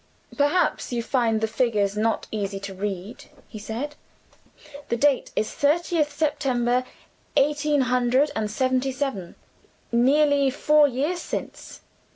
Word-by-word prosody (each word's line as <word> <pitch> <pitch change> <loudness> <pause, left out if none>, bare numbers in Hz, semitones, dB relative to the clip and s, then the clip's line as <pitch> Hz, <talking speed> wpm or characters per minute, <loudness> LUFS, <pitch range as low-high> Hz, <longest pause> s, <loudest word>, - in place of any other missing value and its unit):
"Perhaps 290 +3 +1
you 235 -1 -2
find 230 -4 +1
the 220 - +1
figures 215 -4 0
not 220 +1 0
easy 200 -2 -3
to 200 -1 -6
read," 195 +3 -5 0.2
he 215 - -9
said. 230 +8 -5 1.0
"The 235 - 0
date 280 +1 +2
is 215 - -1
'thirtieth 305 +1 +1
September, 255 -5 0 0.5
eighteen 295 0 +2
hundred 250 +3 +2
and 215 -1 -1
seventy 260 +3 0
seven' 255 -10 -4 0.6
nearly 280 +3 +3
four 295 +2 +4
years 290 +7 -2
since." - - -7
255 Hz, 125 wpm, -24 LUFS, 220-290 Hz, 1.0 s, four